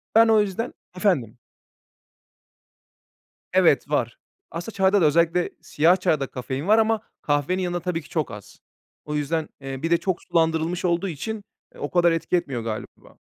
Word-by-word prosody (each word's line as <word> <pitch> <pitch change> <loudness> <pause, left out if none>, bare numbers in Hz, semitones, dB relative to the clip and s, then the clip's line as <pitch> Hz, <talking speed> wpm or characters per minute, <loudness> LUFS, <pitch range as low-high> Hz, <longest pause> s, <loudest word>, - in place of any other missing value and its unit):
Ben 225 0 +7
o 220 -1 +5
yüzden 205 +4 -3 0.2
Efendim? 145 - +1 2.2
Evet, - - +4
var. - - 0 0.3
Aslında 175 +7 -6
çayda 195 +1 +3
da 165 - +4
özellikle 170 +3 +3
siyah 165 +5 +3
çayda 160 -7 +1
kafein 130 +5 -5
var 220 +1 +6
ama 225 0 +2 0.2
kahvenin 150 +6 0
yanında 175 -1 -1
tabii 170 -2 -2
ki 150 - -16
çok 155 -8 -2
az. 105 -3 -11 0.5
O 150 - -5
yüzden, 150 +2 -1
eee, 135 0 -6
bir 165 - -1
de 170 - +6
çok 185 0 -2
sulandırılmış 165 +1 0
olduğu 175 +2 +1
için 205 +7 -5 0.3
o 145 - -4
kadar 175 -1 +4
etki 165 +2 0
etmiyor 135 -9 -2
galiba. 110 -1 -7
170 Hz, 160 wpm, -24 LUFS, 150-185 Hz, 2.2 s, Ben